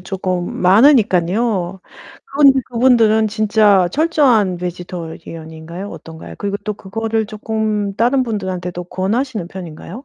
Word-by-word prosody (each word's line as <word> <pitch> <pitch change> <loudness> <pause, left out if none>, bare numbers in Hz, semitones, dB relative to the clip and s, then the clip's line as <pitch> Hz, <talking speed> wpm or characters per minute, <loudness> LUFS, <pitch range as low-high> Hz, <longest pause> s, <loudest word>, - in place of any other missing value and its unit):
쪼끔 185 -1 -3
많으니깐요. 195 - +3 0.4
그런데 275 -1 +4
그분들은 230 -3 +3
진짜 210 -3 +3
철저한 265 - +2
베지테리언 170 -2 -7
인가요? 170 +5 -8
어떤가요? 160 0 -10
그리고 200 0 -2
또 210 -1 -2
그거를 220 +2 -3
쪼끔 215 -1 -2
다른 250 +3 +2
분들한테 190 -6 -4
또 175 0 -6
권하시는 205 +1 -2
편인가요? 185 - -9
205 Hz, 330 characters per minute, -17 LUFS, 180-225 Hz, 0.4 s, 그런데